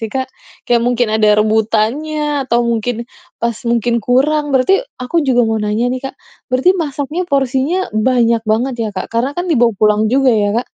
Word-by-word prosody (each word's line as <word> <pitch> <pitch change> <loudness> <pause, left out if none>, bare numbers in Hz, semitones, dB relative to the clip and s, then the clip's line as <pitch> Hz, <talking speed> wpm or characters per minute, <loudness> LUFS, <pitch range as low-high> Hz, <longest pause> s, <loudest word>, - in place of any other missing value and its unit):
sih, 225 - -3
Kak? 260 -1 -1 0.4
kayak 235 -1 +2
mungkin 245 -2 +1
ada 215 -1 +3
rebutannya 220 +8 0 0.2
atau 240 -2 0
mungkin, 235 +1 -2 0.3
pas 235 0 -1 0.2
mungkin 235 0 +1
kurang. 290 +6 +2
Berarti, 280 - +2 0.2
aku 250 +7 -3
juga 250 -2 +3
mau 220 0 0
nanya 210 +3 -1
nih 255 +1 -2
Kak, - - -31 0.4
berarti 255 +8 +3
masaknya 290 +3 -4
porsinya 270 +4 0 0.3
banyak 235 -3 +2
banget 245 +4 0
ya 220 - -2
Kak? 185 - -3
Karena 240 +4 0
kan 355 - -2
dibawa 240 -6 +3
pulang 210 0 +3
juga 265 0 +3
ya 205 -1 +1
Kak. 245 - -4
245 Hz, 180 wpm, -15 LUFS, 225-270 Hz, 0.4 s, ada